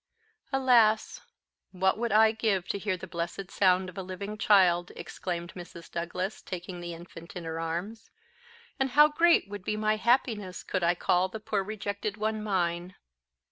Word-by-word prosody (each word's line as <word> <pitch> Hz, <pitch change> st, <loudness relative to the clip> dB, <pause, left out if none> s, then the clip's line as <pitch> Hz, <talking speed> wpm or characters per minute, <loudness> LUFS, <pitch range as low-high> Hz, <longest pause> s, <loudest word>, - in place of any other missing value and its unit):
"Alas! 250 Hz, -, +3 dB, 0.5 s
what 190 Hz, 0 st, +2 dB
would 235 Hz, 0 st, -2 dB
I 220 Hz, +1 st, +6 dB
give 210 Hz, -5 st, 0 dB
to 200 Hz, -, -1 dB
hear 195 Hz, -2 st, -1 dB
the 185 Hz, -, -8 dB
blessed 170 Hz, +2 st, -5 dB
sound 185 Hz, -1 st, +3 dB
of 185 Hz, +1 st, -8 dB
a -, -, -2 dB
living 190 Hz, +3 st, -6 dB
child!" 185 Hz, -5 st, +4 dB
exclaimed 175 Hz, -1 st, -5 dB
Mrs. 170 Hz, -2 st, -11 dB
Douglas, 180 Hz, +4 st, -3 dB
taking 180 Hz, -1 st, -6 dB
the 175 Hz, -1 st, -6 dB
infant 170 Hz, 0 st, -12 dB
in 180 Hz, -, -5 dB
her 165 Hz, 0 st, -4 dB
arms. 175 Hz, +8 st, -4 dB, 0.7 s
"And 265 Hz, 0 st, +1 dB
how 300 Hz, 0 st, +9 dB
great 335 Hz, -5 st, +4 dB
would 205 Hz, -1 st, -7 dB
be 210 Hz, -, -2 dB
my 215 Hz, 0 st, +1 dB
happiness 220 Hz, -5 st, 0 dB
could 185 Hz, -, -2 dB
I 170 Hz, +1 st, +3 dB
call 180 Hz, +2 st, +2 dB
the 220 Hz, -, -7 dB
poor 210 Hz, -1 st, -1 dB
rejected 205 Hz, 0 st, -4 dB
one 215 Hz, 0 st, -1 dB
mine!" 180 Hz, -3 st, -1 dB
190 Hz, 170 wpm, -29 LUFS, 175-215 Hz, 0.7 s, how